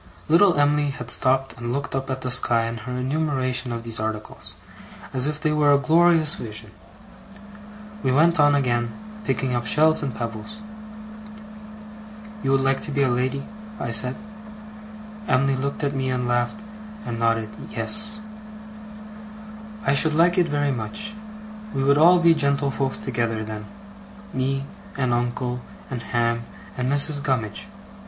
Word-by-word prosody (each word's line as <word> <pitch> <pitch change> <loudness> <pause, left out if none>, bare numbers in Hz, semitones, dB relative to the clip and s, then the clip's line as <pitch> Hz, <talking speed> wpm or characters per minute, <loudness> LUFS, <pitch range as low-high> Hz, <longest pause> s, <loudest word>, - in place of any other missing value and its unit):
Little 170 0 +5
Em'ly 145 0 +2
had 125 -3 -1
stopped 135 +1 +3
and 120 0 -4
looked 140 +3 -3
up 135 0 -3
at 130 0 -3
the 125 - -2
sky 115 -1 +2
in 115 0 -4
her 120 +3 -7
enumeration 130 -2 -1
of 115 -1 -4
these 115 -1 -1
articles, 110 0 -5 0.6
as 130 +1 +2
if 150 0 -3
they 155 - 0
were 150 -1 +3
a - - +6
glorious 160 +1 +4
vision. 105 -2 -7 1.3
We 130 - +1
went 160 +5 +4
on 145 0 +5
again, 120 -4 0 0.4
picking 130 -1 -1
up 120 -2 -2
shells 155 +4 +4
and 135 -6 -3
pebbles. 115 - -5 1.8
'You - - -2
would 135 0 +3
like 135 0 +1
to - - -4
be 140 0 +1
a 130 - +2
lady?' 130 +3 -1 0.3
I 120 - -3
said. 125 +2 +3 1.1
Emily 135 +1 +2
looked 140 +3 -3
at 140 0 0
me, 130 -1 -2
and 125 -1 -1
laughed 120 - -1 0.4
and 115 -1 -4
nodded 115 -1 +1 0.2
'yes'. 215 0 -2 1.6
'I 140 - +3
should 155 +2 +4
like 170 +2 +4
it 175 -3 +2
very 145 -1 0
much. 135 - -5 0.6
We 135 - 0
would 140 +1 +4
all 175 +3 +7
be 170 -1 +5
gentlefolks 140 -3 0
together, 115 -3 -2
then. 105 -1 -7 0.7
Me, 135 +1 -1 0.3
and 130 -3 +1
uncle, 120 +1 -2 0.3
and 125 -3 -4
Ham, 115 0 -1 0.3
and 125 +1 -1
Mrs. 145 0 +2
Gummidge. 130 - -2
135 Hz, 150 wpm, -23 LUFS, 120-145 Hz, 1.8 s, all